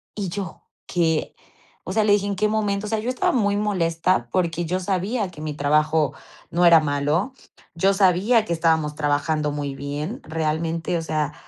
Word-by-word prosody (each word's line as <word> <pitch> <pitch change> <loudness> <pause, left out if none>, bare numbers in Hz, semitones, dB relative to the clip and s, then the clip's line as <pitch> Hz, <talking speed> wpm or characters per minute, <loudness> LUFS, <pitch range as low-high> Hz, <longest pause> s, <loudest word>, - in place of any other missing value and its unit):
Y 200 -3 -3
yo, 190 0 -6 0.2
¿qué? 165 -3 0 0.5
O 185 - -5
sea, 215 +1 +3
le 205 -1 +4
dije: 200 -1 +2
"¿En 200 -1 -2
qué 210 +3 +1
momento?" 210 -1 -1
O - - -5
sea, 220 -1 0
yo 230 - -3
estaba 255 - +1
muy 205 -5 +1
molesta, 185 -4 0
porque 175 -2 0
yo 180 +3 -1
sabía 195 +3 -1
que 155 -4 -12
mi 155 -1 -3
trabajo 150 +1 +2 0.4
no 175 +1 +2
era 170 -1 +8
malo, 150 - 0 0.4
yo 195 +4 +3
sabía 200 +4 +3
que 170 - -1
estábamos 160 -2 +1
trabajando 150 +1 0
muy 145 -1 -4
bien 145 - -5
realmente, 160 +2 -2
o - - -2
sea, 155 -2 -1
170 Hz, 185 wpm, -23 LUFS, 155-200 Hz, 0.5 s, era